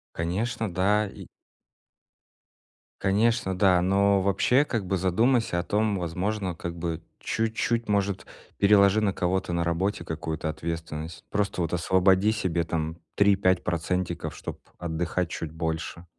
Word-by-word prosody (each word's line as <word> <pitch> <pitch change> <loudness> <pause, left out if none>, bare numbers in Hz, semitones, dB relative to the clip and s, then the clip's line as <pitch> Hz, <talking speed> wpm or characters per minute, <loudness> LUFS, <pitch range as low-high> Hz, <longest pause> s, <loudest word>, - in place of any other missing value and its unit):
Конечно, 105 +6 -2
да, 100 +4 +2
и - - -10 1.8
Конечно, 100 0 +2
да. 90 -2 +4
Но 100 +1 +3
вообще 100 +8 +3
как 115 -8 -2
бы 95 +1 0
задумайся 110 +3 +2
о - - -1
том, 105 +1 +1
возможно 90 +2 -2
как 85 +1 -6
бы 85 -1 -3 0.2
чуть-чуть, 115 +1 -1
может, 100 -2 0 0.3
переложи 100 0 +5
на 100 -2 +1
кого-то 90 0 -1
на 85 0 +1
работе 90 +5 -1
какую-то 80 0 -4
ответственность. 80 0 -5
Просто 100 -3 -1
вот 85 - -2
освободи 95 +3 +3
себе 90 -6 0
там 80 0 -3 0.2
3-5 100 -2 +3
процентиков, 90 +1 -2
чтоб - - -7 0.2
отдыхать 85 +1 -2
чуть 80 -2 -5
больше. 80 +1 -4
95 Hz, 130 wpm, -26 LUFS, 85-100 Hz, 1.8 s, переложи